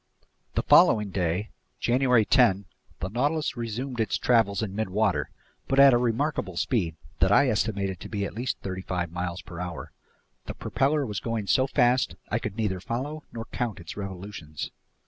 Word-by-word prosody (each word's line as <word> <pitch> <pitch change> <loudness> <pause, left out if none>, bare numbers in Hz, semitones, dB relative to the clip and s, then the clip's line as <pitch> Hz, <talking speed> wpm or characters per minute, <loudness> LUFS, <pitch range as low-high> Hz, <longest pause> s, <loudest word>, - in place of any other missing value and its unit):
THE - - +1
FOLLOWING 105 -3 +5
DAY, 90 +3 -1 0.3
January 125 -2 +3
10, 95 0 +4 0.4
the 95 - -2
Nautilus 145 +9 0
resumed 120 +2 -4
its 110 -3 +1
travels 110 -5 +2
in 100 -3 -4
midwater 110 0 +1 0.4
but 135 - +2
at 140 -1 +9
a 120 - +4
remarkable 120 - -1
speed 90 - 0 0.2
that - - +3
I - - +5
estimated 100 -4 -1
to - - -9
be 100 -2 -2
at - - -6
least 125 +4 -2
thirty 95 -1 -4
five 90 -3 -3
miles 90 0 -4
per 85 -1 -9
hour. 90 -1 -6 0.6
The - - -5
propeller 145 +1 0
was 105 -5 -3
going 115 -3 -3
so 130 +6 +3
fast 125 -1 +2 0.2
I 110 - +1
could 105 -4 -5
neither 105 -5 -1
follow 140 +10 -4
nor 115 -1 -6
count 120 -6 -2
its 85 -2 -8
revolutions. 95 -5 -6
110 Hz, 170 wpm, -27 LUFS, 95-125 Hz, 0.6 s, at